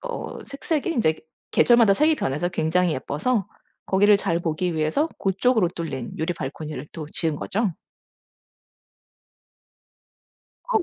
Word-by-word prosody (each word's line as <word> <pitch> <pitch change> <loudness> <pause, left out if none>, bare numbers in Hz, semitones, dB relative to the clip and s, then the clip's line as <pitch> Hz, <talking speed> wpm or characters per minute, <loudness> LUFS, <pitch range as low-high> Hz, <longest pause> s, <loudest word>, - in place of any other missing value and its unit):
어 - - -6
색색이 285 +3 -2
인제 215 - +2 0.3
계절마다 235 -4 +5
색이 305 +9 +3
변해서 150 - -1
굉장히 175 0 +1
예뻐서 190 - -1 0.4
거기를 205 +2 +5
잘 170 -4 0
보기 170 +1 -1
위해서 160 - +1
고쪽으로 200 +1 +2
뚫린 160 -8 -5
유리 160 +3 -1
발코니를 150 -1 -6
또 155 -2 -6
지은 160 -3 -1
거죠. 200 +3 -1 3.0
어. 445 - +5
180 Hz, 265 characters per minute, -24 LUFS, 155-230 Hz, 3.0 s, 계절마다